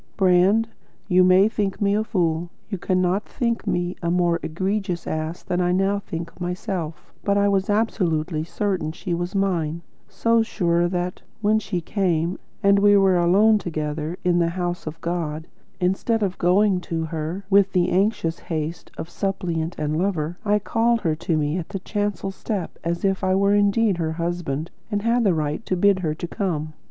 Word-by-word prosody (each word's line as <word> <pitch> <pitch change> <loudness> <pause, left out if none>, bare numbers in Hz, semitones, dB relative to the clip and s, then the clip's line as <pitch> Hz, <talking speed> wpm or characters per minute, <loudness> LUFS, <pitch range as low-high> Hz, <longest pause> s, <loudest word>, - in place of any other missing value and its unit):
Brand, 195 +4 +4 0.4
you 185 -2 +5
may 185 +2 +6
think 205 -3 -2
me 200 -1 +2
a 215 +1 +2
fool; 170 -5 0 0.2
you 195 -4 -4
cannot 185 +3 0
think 235 -2 -2
me 175 0 -1
a 170 - -1
more 175 -1 +2
egregious 185 +1 -2
ass 155 +2 -3
than 180 0 -1
I 180 0 +2
now 195 +2 +2
think 170 -2 -7
myself; 180 -2 -4
but 200 0 +2
I 200 0 +3
was 195 -1 +1
absolutely 175 -7 0
certain 175 -2 -2
she 175 +2 -4
was 175 +3 -3
mine; 170 -4 0 0.2
so 230 +4 +2
sure 175 -5 +1
that, 180 0 -3 0.2
when 215 +1 +3
she 190 -4 -3
came, 175 -2 0 0.2
and 200 0 +5
we 205 0 +6
were 195 -2 +4
alone 205 +5 +5
together 155 -1 -3
in 175 -1 +3
the 170 -1 +2
house 175 -1 -3
of 155 +1 -6
God, 160 -2 -3 0.3
instead 195 +5 +1
of 190 -2 -2
going 190 +2 +3
to 165 -2 -3
her 160 +4 -4
with 200 0 +5
the 180 -1 +2
anxious 185 -3 +1
haste 160 0 -4
of - - -5
suppliant 175 -3 -2
and 150 0 -1
lover, 175 -3 -1
I 210 -1 +3
called 230 +3 +1
her 165 -5 +1
to 165 0 -1
me 150 +3 0
at 165 - -7
the 200 - -3
chancel 205 0 -2
step 195 -2 -4
as 170 +2 -1
if 195 0 0
I 185 0 +2
were 200 +1 +3
indeed 205 -1 +3
her 160 -2 -1
husband 170 -2 -3 0.2
and 205 -2 -1
had 235 +1 +2
the 195 -5 +3
right 150 +6 -2
to 185 - 0
bid 200 +1 +4
her 155 -4 -1
come. 160 -3 -3
180 Hz, 180 wpm, -23 LUFS, 170-200 Hz, 0.4 s, may